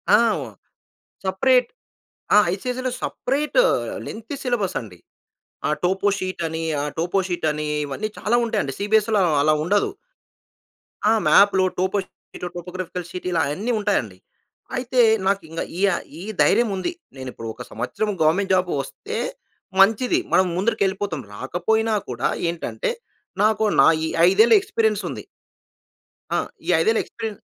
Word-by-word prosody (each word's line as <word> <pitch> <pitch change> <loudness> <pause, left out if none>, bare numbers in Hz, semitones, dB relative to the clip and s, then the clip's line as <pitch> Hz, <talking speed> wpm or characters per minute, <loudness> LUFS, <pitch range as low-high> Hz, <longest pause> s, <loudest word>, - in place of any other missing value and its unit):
ఆ! - - +7 0.2
వో 135 - -5 0.8
సెపరేట్ 245 +7 +3 0.7
ఆహ్, 210 - +6
ఐసీఎస్ఈలో 250 +6 -3
సెపరేట్ 290 - -2 0.5
లెంగ్తీ 230 +5 -7
సిలబసండి. 190 - -2 0.7
ఆహ్, 150 - +1
టోపోషీటని 185 -3 -1 0.2
ఆహ్, 150 - -3
టోపోషీటని 175 -4 -1 0.2
ఇవన్నీ 205 +10 -4
చాలా 230 +3 +1
ఉంటాయండి. 140 - -1
సిబీఎస్‌‌‌‌‌‌‌‌‌ఈలో 210 -4 +2
అలా 155 +1 +4
ఉండదు. 200 +5 +1 1.2
ఆ! - - +5 0.2
మ్యాప్‌లు, 200 -2 +6 0.2
టోపోషీట్, 190 -1 -3 0.2
టోగ్రాఫికల్ 180 -1 -5
షీట్ 180 +1 -6
ఇలా 165 -2 +2
అయన్నీ 200 +12 -2
ఉంటాయండి. 120 - -1 0.6
అయితే, 250 0 +1 0.2
నాకింక 180 -5 -1 0.2
ఈయ 200 - +4 0.3
ఈ - - -7 0.2
ధైర్యముంది. 205 - +2 0.3
నేనిప్పుడు 125 -3 -7
ఒక - - -9
సంవత్సరం 215 +1 -2
గవర్నమెంట్ 185 +6 +2
జాబ్ 185 -1 +2
వస్తే 135 - -7 0.6
మంచిది. 225 - +4
మనం 185 - +5
ముందరికెళ్ళిపోతాం. 195 -5 0
రాకపోయినా 220 - 0 0.2
కూడా - - -1 0.2
ఏంటంటే, 465 - -3 0.5
నాకు, 220 0 +3 0.2
నా - - +7 0.2
ఈ - - -1 0.2
ఐదేళ్ల 220 - +5
ఎక్స్పీరియన్సుంది. 440 +2 -1 1.1
ఆ! - - +3 0.3
ఈ - - -2
ఐదేళ్ల 450 0 +3
ఎక్స్పీరియన్ 220 -3 -6
195 Hz, 115 wpm, -22 LUFS, 175-220 Hz, 1.2 s, ఆ